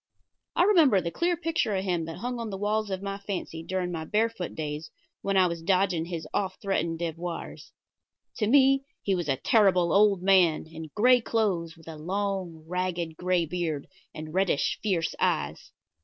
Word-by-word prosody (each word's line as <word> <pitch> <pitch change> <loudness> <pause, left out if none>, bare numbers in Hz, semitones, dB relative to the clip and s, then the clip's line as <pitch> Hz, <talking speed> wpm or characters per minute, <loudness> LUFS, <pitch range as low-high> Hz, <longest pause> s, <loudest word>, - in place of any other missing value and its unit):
I - - +4
remember 330 - +5
the 170 -2 -3
clear 345 - 0
picture 325 - 0
of 190 - -1
him 175 -4 -1
that 165 0 -7
hung 245 0 -4
on 230 -1 -4
the 195 - -5
walls 210 +1 0
of 190 0 -4
my 200 0 -4
fancy 190 -5 -5
during 180 +1 -2
my 165 -2 -4
barefoot 215 0 -1
days 150 0 -4 0.3
when 195 -1 0
I 185 - +6
was 170 -2 -2
dodging 180 -1 +1
his 170 -2 -5
oft 190 -2 -1
threatened 170 -4 -1
devoirs. 170 +1 -5 0.7
To 215 - +1
me 270 +2 +5 0.2
he 195 - +1
was 175 -5 -2
a 135 - +3
terrible 185 - +3
old 200 -2 +4
man, 185 -5 +4
in 160 0 -9
gray 245 +3 +5
clothes, 190 -9 -1
with 160 - -18
a 160 -1 -7
long, 185 -1 -3
ragged, 175 -2 -2
gray 180 0 +1
beard, 160 -3 -3 0.3
and 155 0 -8
reddish, 190 -6 +1
fierce 185 -6 0
eyes. - - -1
185 Hz, 180 wpm, -27 LUFS, 165-205 Hz, 0.7 s, I